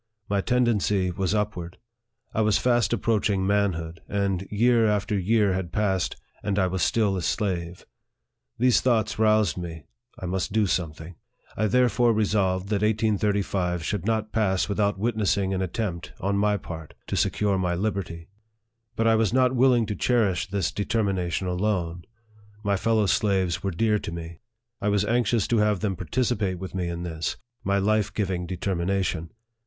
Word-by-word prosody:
My 100 Hz, -1 st, +1 dB
tendency 105 Hz, -6 st, +1 dB
was 95 Hz, +3 st, -1 dB
upward. 90 Hz, -5 st, -3 dB, 0.6 s
I 110 Hz, -, +1 dB
was 110 Hz, -1 st, +3 dB
fast 120 Hz, -5 st, +2 dB
approaching 105 Hz, -4 st, +1 dB
manhood, 90 Hz, -5 st, 0 dB
and 100 Hz, -2 st, -1 dB
year 115 Hz, +2 st, +3 dB
after 105 Hz, 0 st, 0 dB
year 100 Hz, +1 st, +2 dB
had 95 Hz, -2 st, -3 dB
passed, 95 Hz, -4 st, 0 dB, 0.3 s
and 100 Hz, -1 st, -1 dB
I 95 Hz, -, +3 dB
was 90 Hz, 0 st, -2 dB
still 105 Hz, -1 st, +2 dB
a 95 Hz, -, -2 dB
slave. 90 Hz, -3 st, -2 dB, 0.7 s
These 125 Hz, 0 st, +4 dB
thoughts 115 Hz, -5 st, +1 dB
roused 110 Hz, -5 st, +3 dB
me 85 Hz, -3 st, -7 dB, 0.4 s
I -, -, -5 dB
must 95 Hz, +2 st, -2 dB
do 110 Hz, 0 st, +2 dB
something. 85 Hz, -2 st, -3 dB, 0.4 s
I 110 Hz, -, +1 dB
therefore 120 Hz, +1 st, +3 dB
re 110 Hz, 0 st, +2 dB
solved 95 Hz, -2 st, 0 dB
that 105 Hz, -2 st, 0 dB
1835 100 Hz, -5 st, 0 dB
should 100 Hz, -1 st, -2 dB
not 110 Hz, 0 st, -1 dB
pass 95 Hz, -4 st, +1 dB
without 100 Hz, -1 st, 0 dB
witnessing 100 Hz, -3 st, 0 dB
an 95 Hz, -, -1 dB
attempt, 90 Hz, -2 st, -3 dB
on 100 Hz, +2 st, 0 dB
my 105 Hz, +1 st, +2 dB
part, 80 Hz, -4 st, -9 dB
to -, -, -3 dB
secure 100 Hz, -2 st, +1 dB
my 90 Hz, -1 st, 0 dB
liberty. 90 Hz, -4 st, -3 dB, 0.7 s
But 115 Hz, -, 0 dB
I 115 Hz, -, +5 dB
was 110 Hz, -2 st, +2 dB
not 130 Hz, 0 st, +3 dB
willing 125 Hz, -2 st, +4 dB
to 105 Hz, 0 st, -3 dB
cherish 100 Hz, -8 st, +1 dB
this 95 Hz, -3 st, -1 dB
determination 100 Hz, -4 st, -1 dB
alone. 90 Hz, -2 st, -1 dB, 0.6 s
My 100 Hz, -1 st, +1 dB
fellow 110 Hz, +2 st, +2 dB
slaves 95 Hz, -3 st, +1 dB
were 95 Hz, -, -1 dB
dear 105 Hz, +4 st, +1 dB
to -, -, -6 dB
me. 85 Hz, 0 st, -7 dB, 0.4 s
I 105 Hz, -, +1 dB
was 105 Hz, 0 st, +2 dB
anxious 115 Hz, -1 st, +1 dB
to 115 Hz, -, +3 dB
have 105 Hz, -3 st, +2 dB
them 100 Hz, -3 st, -1 dB
participate 100 Hz, 0 st, -1 dB
with 95 Hz, +1 st, -7 dB
me 90 Hz, -2 st, -2 dB
in 85 Hz, 0 st, -4 dB
this, 80 Hz, -2 st, -3 dB, 0.3 s
my 100 Hz, +1 st, +1 dB
life 105 Hz, +1 st, +1 dB
giving 95 Hz, -4 st, -2 dB
deter 95 Hz, +2 st, -2 dB
mination. 90 Hz, -2 st, -1 dB
100 Hz, 165 wpm, -25 LUFS, 90-110 Hz, 0.7 s, I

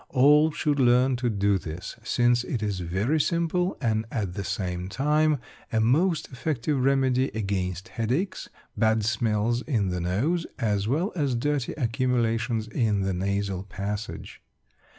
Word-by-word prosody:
All 150 Hz, +4 st, +5 dB
should 145 Hz, -1 st, 0 dB
learn 125 Hz, +1 st, +4 dB
to 120 Hz, 0 st, 0 dB
do 100 Hz, -2 st, +1 dB
this, 80 Hz, +1 st, -7 dB
since 120 Hz, +1 st, +2 dB
it 120 Hz, -3 st, -3 dB
is 100 Hz, -3 st, -1 dB
very 95 Hz, -, 0 dB
simple, 170 Hz, +3 st, 0 dB
and 110 Hz, -3 st, 0 dB
at 100 Hz, -8 st, -2 dB
the 100 Hz, -, -4 dB
same 90 Hz, -1 st, -3 dB
time 150 Hz, +6 st, +2 dB, 0.3 s
a 110 Hz, -, +1 dB
most 155 Hz, +9 st, +2 dB
effective 135 Hz, +1 st, -1 dB
remedy 130 Hz, -1 st, +2 dB
against 95 Hz, -1 st, -2 dB
headaches, 130 Hz, -, -2 dB, 0.3 s
bad 110 Hz, -1 st, +2 dB
smells 110 Hz, +1 st, +1 dB
in 110 Hz, -10 st, 0 dB
the 90 Hz, -1 st, -2 dB
nose, 135 Hz, -, 0 dB
as 105 Hz, -3 st, 0 dB
well 160 Hz, -, 0 dB
as 140 Hz, -7 st, 0 dB
dirty 140 Hz, +1 st, -1 dB
accumulations 115 Hz, -3 st, 0 dB
in 110 Hz, -3 st, 0 dB
the 95 Hz, 0 st, 0 dB
nasal 100 Hz, 0 st, -1 dB
passage. 100 Hz, +2 st, -6 dB
115 Hz, 145 wpm, -26 LUFS, 100-135 Hz, 0.3 s, All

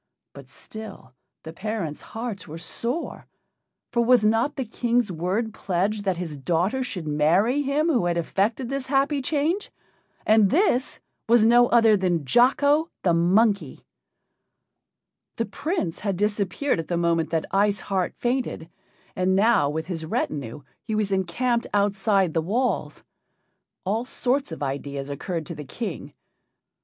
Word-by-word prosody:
But -, -, -13 dB
still 215 Hz, -12 st, -11 dB, 0.3 s
the 160 Hz, -, -8 dB
parents' 190 Hz, -6 st, -4 dB
hearts 225 Hz, -4 st, -6 dB
were 160 Hz, +1 st, -7 dB
sore, 235 Hz, -, -5 dB, 0.6 s
for 235 Hz, -, +2 dB
was 240 Hz, -2 st, +4 dB
not 225 Hz, +6 st, +2 dB
the 265 Hz, -, -3 dB
King's 235 Hz, -1 st, 0 dB
word 190 Hz, +7 st, -2 dB
pledged 200 Hz, +2 st, -1 dB
that 190 Hz, -3 st, 0 dB
his 165 Hz, -4 st, -5 dB
daughter 175 Hz, -, 0 dB
should 195 Hz, -10 st, -4 dB
marry 170 Hz, -, +2 dB
him 285 Hz, +2 st, 0 dB
who 250 Hz, -, +2 dB
had 170 Hz, 0 st, 0 dB
effected 210 Hz, +8 st, 0 dB
this 275 Hz, 0 st, -4 dB
happy 275 Hz, +1 st, +1 dB
change? 310 Hz, +8 st, -1 dB, 0.5 s
And 215 Hz, -2 st, +5 dB
this 285 Hz, -, +1 dB, 0.3 s
was 235 Hz, -2 st, +6 dB
no 240 Hz, +1 st, +6 dB
other 230 Hz, -3 st, +5 dB
than 175 Hz, -6 st, 0 dB
Jocko, 285 Hz, -, +3 dB
the 175 Hz, -, +3 dB
monkey! 185 Hz, -, +2 dB, 1.5 s
The 230 Hz, -, -1 dB
Prince 280 Hz, -, -3 dB
had 200 Hz, -4 st, -2 dB
disappeared 210 Hz, -, 0 dB
at 165 Hz, -, -4 dB
the 175 Hz, -, -1 dB
moment 170 Hz, -1 st, +1 dB
that 165 Hz, -1 st, -1 dB
Ice 200 Hz, 0 st, +2 dB
Heart 190 Hz, -2 st, -2 dB
fainted, 240 Hz, -10 st, -2 dB, 0.4 s
and 185 Hz, +1 st, +1 dB
now 200 Hz, -7 st, +4 dB
with 160 Hz, +2 st, -3 dB
his 170 Hz, -3 st, -5 dB
retinue 145 Hz, -4 st, -3 dB, 0.2 s
he 220 Hz, -, -4 dB
was 210 Hz, -2 st, 0 dB
encamped 230 Hz, +6 st, 0 dB
outside 200 Hz, -3 st, +2 dB
the 165 Hz, -, +1 dB
walls. 235 Hz, +10 st, -1 dB, 0.8 s
All 220 Hz, +5 st, -1 dB
sorts 260 Hz, -2 st, -1 dB
of 160 Hz, -, -5 dB
ideas 140 Hz, 0 st, -4 dB
occurred 165 Hz, +3 st, -4 dB
to 170 Hz, -, -6 dB
the 150 Hz, -, -7 dB
King. 185 Hz, -, -6 dB
205 Hz, 145 wpm, -24 LUFS, 170-240 Hz, 1.5 s, was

